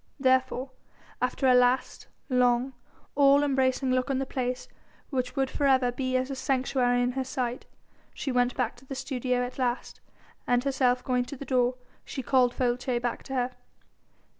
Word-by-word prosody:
Therefore 260 0 +1 0.5
after 250 +2 0
a 255 - +6
last, 250 +1 +2 0.2
long, 250 0 +2 0.4
all 280 0 +5
embracing 265 -1 +1
look 255 +1 +1
on 270 - +1
the 270 - -1
place 255 -1 -3 0.4
which 250 -2 -2
would 270 -1 +1
for 285 - +1
ever 260 -2 +3
be 255 +1 -1
as 255 +2 -2
a - - -3
sanctuary 255 -2 +1
in 245 - +1
her 265 +1 -2
sight 250 -1 -3 0.4
she 275 - -4
went 245 0 +1
back 245 -3 -1
to 255 - -17
the 270 - -5
studio 250 -2 -1
at 250 +2 -9
last, 245 -1 -2 0.5
and 245 0 +2
herself 255 -2 +1
going 250 -1 0
to 280 - -8
the 280 - -7
door 250 -1 +2 0.3
she 265 - -6
called 250 -1 +3
Folces 245 0 0
back 240 -1 -3
to 270 - -6
her. 250 0 0
255 Hz, 175 wpm, -27 LUFS, 245-265 Hz, 0.5 s, a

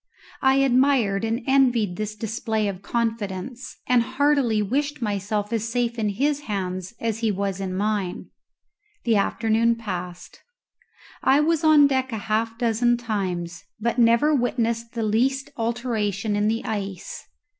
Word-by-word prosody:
I 265 0 +4
admired 255 -6 +3
and 225 +2 -1
envied 245 -8 +3
this 215 +2 -4
display 220 0 -2
of 195 -2 -4
confidence, 230 +1 -3
and 250 -1 +4
heartily 260 -2 +2
wished 280 +8 -1
myself 210 -1 -2
as 225 0 -1
safe 240 0 -1
in 215 -1 +1
his 280 +8 0
hands 185 -5 -4
as 225 -1 -2
he 225 -2 +1
was 195 -1 -2
in 185 -1 -3
mine. 205 -3 -2 0.7
The 230 -3 +3
afternoon 225 +3 +2
passed. 180 -5 -7 0.8
I 270 +2 +4
was 320 +1 +1
on 310 -2 +7
deck 265 -2 0
a 225 - -2
half 225 +2 -1
dozen 240 0 +2
times, 185 -7 -3 0.2
but 235 +2 -1
never 235 +6 +4
witnessed 235 -3 -1
the 230 -2 -2
least 260 +6 0
alteration 225 -3 -1
in 205 +1 +1
the 225 +2 -1
ice. 200 -4 -5
225 Hz, 145 wpm, -24 LUFS, 205-245 Hz, 0.8 s, on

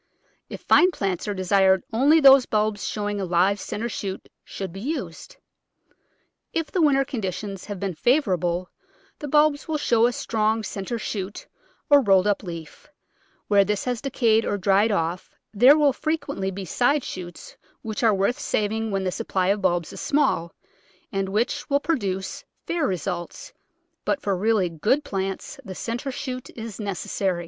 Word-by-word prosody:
If - - -8
fine 360 - +5
plants 195 - -3
are 205 - -1
desired 190 0 +3
only 285 +8 +5
those 270 -3 +7
bulbs 215 -2 0
showing 205 -1 -2
a - - -2
live 185 +3 +2
centre 225 +3 -4
shoot 195 -4 -5
should 190 -3 -7
be 195 - -8
used. 325 - -5 1.2
If 325 -3 -2
the 365 - +1
winter 275 -3 +4
conditions 200 -5 -5
have 205 -3 -6
been 195 -1 -2
favour 245 - +2
able 175 +1 -2 0.5
the 295 - -5
bulbs 295 0 +3
will 315 -1 -1
show 235 -5 +3
a - - 0
strong 220 -2 0
centre 200 +3 -4
shoot 205 -2 -5 0.4
or 285 -1 +6
rolled 195 -5 +4
up 205 -1 +1
leaf; 170 - -9 0.6
where 200 -1 +5
this 205 0 -1
has 245 -2 -2
decayed 230 -5 +2
or 205 - -1
dried 200 +3 +3
off 170 -1 -2 0.2
there 250 +8 +7
will 290 -3 +4
frequently 280 -10 -2
be 195 0 -6
side 255 - +1
shoots 175 -2 -8 0.3
which 220 -1 -4
are 230 -2 +5
worth 200 +5 0
saving 220 +1 -1
when 195 -2 -1
the 185 - -1
supply 190 -3 -1
of 200 +1 +1
bulbs 175 -3 0
is - - -7
small, 270 - +1 0.6
and 195 -1 -2
which 215 +5 -1
will 280 0 +3
produce 195 - -2 0.2
fair 335 -4 0
results, 180 -1 -4 0.5
but 290 - 0
for 200 -7 -1
really 210 0 +2
good 210 - 0
plants 195 +1 -4
the 190 -5 -8
centre 240 +7 -4
shoot 255 -1 -6
is 225 -2 -7
necessary. 195 -2 -2
210 Hz, 165 wpm, -24 LUFS, 190-255 Hz, 1.2 s, those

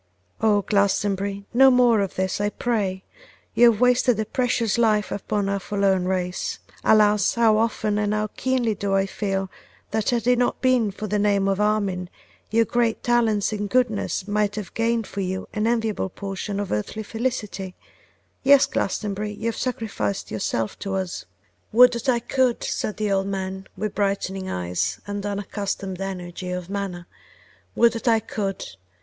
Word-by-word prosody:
'O! 210 -2 +3
Glastonbury, 200 0 0
no 265 +2 +7
more 245 -3 +5
of 195 -2 -3
this 190 +1 -1
I 205 - +1
pray; 200 -4 -2 0.5
you 240 0 +7
have 215 - -4
wasted 250 -2 +3
a 220 - 0
precious 235 -2 0
life 215 -3 +2
upon 205 0 -2
our 200 0 0
forlorn 195 -2 +1
race. 180 -1 -2 0.3
Alas! 210 -2 +4
how 225 -2 +4
often 215 -2 0
and 205 0 0
how 215 0 0
keenly 255 -4 0
do 200 -1 -1
I 195 0 +3
feel, 195 -1 -3 0.4
that 220 0 0
had 235 -2 0
it 250 0 +3
not 245 - +1
been 255 -4 +3
for 200 +2 -6
the 210 0 0
name 200 -1 +2
of 195 +1 +1
Armine 200 -4 0 0.4
your 230 +1 +3
great 235 0 0
talents 225 -4 +2
and 205 -1 -3
goodness 220 -5 0
might 210 0 0
have 210 -4 -6
gained 230 0 0
for 200 - -5
you 190 0 -3
an 215 +1 0
enviable 225 -4 0
portion 195 +1 -5
of 205 - -3
earthly 105 - -2
felicity; 210 -5 -3 0.7
yes, 275 0 +6
Glastonbury, 210 +1 -2
you 210 +2 -8
have 230 - 0
sacrificed 105 - -3
yourself 110 +1 -2
to 195 -1 -3
us.' 190 -2 -3 0.5
'Would 250 +2 +7
that 235 +2 -2
I 245 - +4
could!' 255 0 +1
said 210 - -2
the 210 -1 -1
old 195 0 +1
man, 190 -1 -4
with 215 -1 -3
brightening 195 -1 -1
eyes 90 -2 -2
and 205 0 -4
an 205 - -1
unaccustomed 195 -2 -4
energy 180 -1 -5
of 180 0 -5
manner. 195 -3 -4 0.7
'Would 235 0 +5
that 230 +2 -5
I 225 -1 +5
could! 200 -2 -4
205 Hz, 170 wpm, -23 LUFS, 195-225 Hz, 0.7 s, no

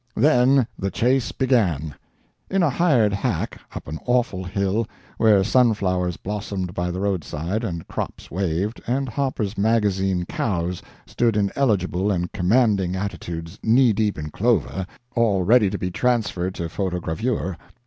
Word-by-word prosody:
Then 130 0 +4
the 95 - -1
chase 125 +4 +1
began—in 115 - -1
a 155 - +3
hired 125 - +3
hack, 100 - -2
up - - -7
an 80 +2 -5
awful 120 -6 +1
hill, 100 +4 -1 0.3
where 105 -4 +5
sunflowers 95 -7 +2
blossomed 100 -3 -4
by 90 0 -2
the 90 +1 -3
roadside, 95 - -2
and 85 -7 -4
crops - - -5
waved, 95 +4 -1
and 135 +3 0
Harper's 115 -5 -2
Magazine 95 -4 +1
cows 90 -3 -2 0.2
stood 115 -3 +1
in 100 -1 +1
eligible 100 -7 +1
and 90 -2 -1
commanding 100 -2 +2
attitudes 85 -2 -5
knee 120 +1 +4
deep 105 0 0
in 75 0 -5
clover, 100 -3 0 0.3
all 105 -6 +2
ready 110 +1 +5
to 100 - -3
be 90 -1 -3
transferred 105 -5 0
to - - -4
photogravure. 90 +3 -2
100 Hz, 140 wpm, -23 LUFS, 90-115 Hz, 0.3 s, where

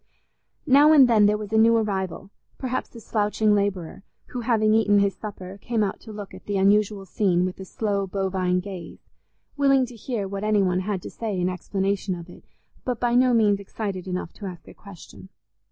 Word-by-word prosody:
Now 290 +2 +6
and 275 -4 +8
then 215 -3 +5
there 210 0 +2
was 210 0 -7
a 220 - +4
new 230 +1 +5
arrival; 195 -2 -3 0.3
perhaps 255 -1 -4
a - - -8
slouching 210 -1 +1
labourer, 200 -5 -1 0.3
who, 250 - -5
having 220 -2 +2
eaten 210 -2 +4
his 200 -1 +2
supper, 195 -1 -8
came 230 -3 0
out 195 - -3
to 220 - -11
look 205 -2 -8
at - - -12
the 205 -1 -1
unusual 200 0 +2
scene 180 -2 +1
with 185 +1 -5
a 190 - -7
slow 200 0 -2
bovine 185 -1 -1
gaze, 180 -4 -10 0.5
willing 275 -2 +4
to 245 -1 -12
hear 220 -3 -4
what 195 +1 -5
any 210 -1 +2
one 180 -1 +1
had 190 -1 -3
to - - -7
say 215 -5 -4
in 180 +1 +1
explanation 195 +1 -2
of 170 0 -10
it, - - -16 0.4
but 245 -3 -2
by 240 -1 +1
no 250 +1 +4
means 205 -3 +3
excited 195 -2 -5
enough 180 -2 -4
to 205 - -8
ask 175 -4 -10
a - - -12
question. 190 -1 -13
205 Hz, 200 wpm, -24 LUFS, 190-220 Hz, 0.5 s, and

